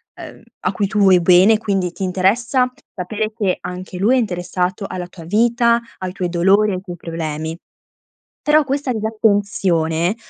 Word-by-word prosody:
ehm - - -11 0.2
a - - 0
cui 200 -2 -1
tu 210 +1 -2
vuoi 190 -2 +6
bene, 185 +5 +5
quindi 195 -5 -1
ti 195 - -6
interessa 230 +8 +1 0.2
sapere 215 +4 -3
che 200 -5 0
anche 180 0 -7
lui 215 +8 +3
è - - +3
interessato 180 -2 -2
alla 180 -1 -5
tua 170 -2 -13
vita, 235 +4 +2 0.2
ai 185 -1 -5
tuoi 180 -2 -3
dolori, 195 +4 +3
ai 185 - -3
tuoi 180 -3 -8
problemi; 160 -1 -5 0.8
però, 300 +1 +4
questa 275 0 -2
disattenzione 200 -5 0
195 Hz, 155 wpm, -19 LUFS, 180-220 Hz, 0.8 s, vuoi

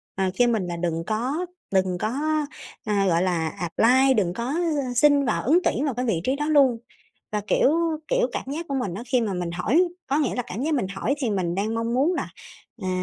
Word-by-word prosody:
ờ, 190 - 0
kêu 245 +3 +4
mình 220 -6 0
là 175 -1 -4
đừng 165 -1 -2
có 255 +11 -1 0.3
đừng 185 -1 +2
có, 215 +4 -2 0.7
ờ, 215 - -1
gọi 170 0 +2
là, 170 -3 0
apply, 250 +11 +3
đừng 185 -6 +1
có, 235 +5 -4
ư, 300 -7 -1
xin 285 +2 +4
vào 225 - 0
ứng 310 +8 +4
tuyển 280 - 0
vào 280 - 0
cái 250 +2 -2
vị 190 -8 0
trí 260 +7 +1
đó 295 +1 -2
luôn. 275 -6 +4 0.6
Và, 210 - 0
kiểu 265 - +3 0.4
kiểu, - - +2
cảm - - -3
giác 330 +3 -4
của 280 - -2
mình 205 -10 -2
á 215 - -5
khi 250 0 +2
mà 215 -4 -1
mình 175 -1 -3
hỏi 215 - +2 0.2
có 280 - +1
nghĩa 295 -5 0
là 245 - -1
cảm 215 +7 -5
giác 310 +2 0
mình 250 -9 0
hỏi 195 +8 -1
thì 255 -5 -1
mình 180 -4 -1
đang 210 +4 -1
mong 230 +1 -1
muốn 290 +8 +2
là, - - -3 0.5
à 185 - -2
235 Hz, 235 wpm, -24 LUFS, 190-280 Hz, 0.7 s, kêu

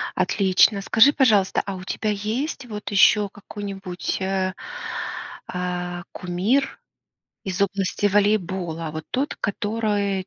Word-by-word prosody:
Отлично, 190 +2 +3
скажи, 225 +7 +6
пожалуйста, 215 -10 +3
а 195 -1 -4
у 185 - -8
тебя 215 +3 -2
есть 225 +8 -3
вот 210 -3 -6
еще 205 +1 +5
какой-нибудь, 195 -3 -5
э, 190 0 0 0.9
а, 180 -1 -3
кумир 195 +10 0 0.7
из 190 0 -3
области 195 0 0
волейбола, 190 -5 +1
вот 155 0 -5
тот, 275 +3 -1
который, 205 -2 -1
195 Hz, 110 wpm, -23 LUFS, 185-210 Hz, 0.9 s, скажи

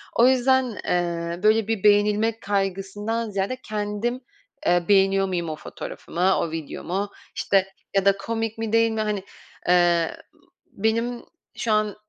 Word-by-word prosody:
O 240 +2 +6
yüzden, 260 -3 +3
eee, 170 0 -1
böyle 215 0 +4
bir 225 -4 -1
beğenilmek 210 +2 +3
kaygısından 205 +3 -2
ziyade 200 +5 -2
kendim, 215 +4 -2 0.4
eee, 175 0 +3
beğeniyor 195 -1 +4
muyum 170 -3 -2
o 155 - -3
fotoğrafımı, 180 +4 -2
o 165 - -1
videomu, 180 +5 -4 0.3
işte 195 -1 +2 0.3
ya 195 0 +3
da 195 0 +4
komik 225 +1 -3
mi, 225 -1 -3
değil 230 0 +4
mi 220 0 -1
hani, 210 -3 -2 0.4
eee, 175 -2 +3 0.5
benim 230 +3 -1 0.3
şu 225 - -1
an, 215 -1 +1
205 Hz, 140 wpm, -24 LUFS, 190-225 Hz, 0.5 s, O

